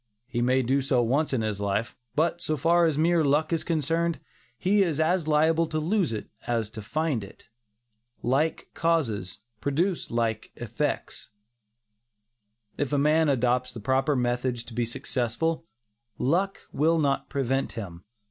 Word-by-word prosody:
He 120 -1 -2
may 130 +2 +3
do 135 +3 +2
so 130 -2 +2
once 140 +7 +1
in 125 -4 0
his 105 -2 -2
life; 100 +3 -1 0.2
but 170 +3 +1
so 155 -2 -1
far 170 +4 +4
as 155 -3 0
mere 165 +1 +3
luck 150 +3 +2
is 165 - 0
concerned, 165 +1 0 0.4
he 200 +7 +3
is 165 -6 +1
as 165 +1 +2
liable 160 +2 +3
to 155 - -3
lose 170 - +1
it 110 - -4 0.2
as 115 -3 -1
to 110 -1 -7
find 145 +1 -1
it. 100 +3 -14 0.7
"Like 140 +6 0
causes 115 - 0 0.2
produce 165 - 0
like 115 -2 -1
effects." - - -3 1.5
If 145 -1 -1
a 145 - +2
man 155 +2 +3
adopts 125 -1 +1
the 115 - -7
proper 135 +5 +1
methods 125 -1 0
to 120 - -11
be 120 +1 0
successful, 125 +5 -2 0.5
"luck" 185 +8 0
will 160 +4 +3
not 140 -3 0
prevent 135 -1 -1
him. 90 -7 -7
140 Hz, 155 wpm, -27 LUFS, 120-160 Hz, 1.5 s, far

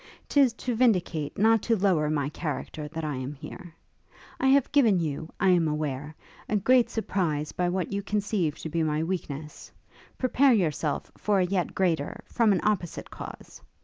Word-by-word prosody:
'Tis 275 -4 +4
to 245 +1 -3
vindicate, 180 - +1
not 225 +1 +4
to 230 - +1
lower 180 -6 +2
my 145 -2 0
character 150 -1 -5
that 160 +2 -6
I 150 -3 -2
am 130 +2 -4
here. 165 +4 -10 0.6
I 265 - +2
have 275 0 +4
given 230 -10 +4
you, 160 0 -3
I 190 - +3
am 175 -3 +4
aware, 150 -1 -3 0.3
a 215 - +1
great 245 +4 +4
surprise 165 -9 -1
by 180 -1 0
what 185 0 -2
you 200 - -1
conceive 200 -6 -1
to 160 - -5
be 165 +2 -1
my 155 0 0
weakness; 155 -4 -5 0.5
prepare 260 +1 +4
yourself 155 -7 -1
for 210 -1 +1
a 185 - +3
yet 180 -1 -1
greater, 165 -6 0
from 230 -3 +2
an 190 - +2
opposite 200 -5 -1
cause. - - -10
175 Hz, 175 wpm, -27 LUFS, 155-210 Hz, 0.6 s, Tis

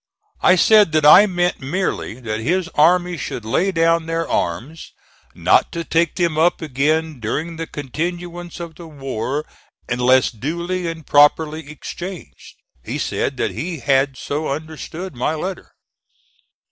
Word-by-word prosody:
I 185 - +6
said 205 -2 +5
that 155 -1 +3
I 200 +8 +9
meant 175 -2 0
merely 140 - -3
that 110 -2 -3
his 170 +9 0
army 175 +2 +3
should 120 -5 -5
lay 180 - +1
down 165 -1 +2
their 165 0 -1
arms, 120 - -3 0.4
not - - +3
to 170 - -3
take 165 +1 +1
them 170 -4 0
up 170 +2 +3
again 155 0 -1
during 155 +9 -3
the 165 0 -4
continuance 175 +5 -5
of 170 -1 -7
the 165 +1 -11
war 135 -1 -4 0.4
unless 125 +1 +3
duly 170 - -3
and 165 -2 -6
properly 150 +1 +3
exchanged. 170 - -9 0.3
He - - -4
said - - -2
that - - -1
he 170 +1 -4
had 135 0 +2
so 150 +2 -3
understood 160 +4 -6
my 125 +6 -1
letter. 180 +4 -5
160 Hz, 145 wpm, -20 LUFS, 140-175 Hz, 0.4 s, I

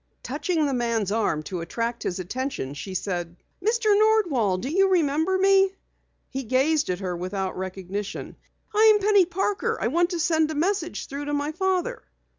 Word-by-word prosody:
Touching 335 -5 -1
the 280 - 0
man's 230 -5 0
arm 205 -8 0
to 180 +1 -5
attract 230 +7 -3
his 180 - -2
attention, 195 - -4
she 185 +6 -7
said 175 -3 -3 0.2
breathlessly: 440 +2 +1
"Mr. 405 - +5
Nordwall, 340 - +3
do 245 - -4
you 385 +6 +3
remember 325 +1 +2
me?" 390 0 +4 0.5
He 270 - -4
gazed 270 +5 +1
at 180 +1 -2
her 180 -2 -2
without 185 +2 -3
recognition. 190 +2 -5 0.4
"I'm 430 0 +6
Penny 405 -3 +4
Parker. 410 +5 -1
I 225 - 0
want 345 +5 +2
to 355 - -2
get 320 -1 +2
a - - -4
message 345 +2 -1
through 280 +1 -6
to 290 0 -1
my 290 +1 -1
father." 380 +7 -1
290 Hz, 175 wpm, -25 LUFS, -, 0.5 s, I'm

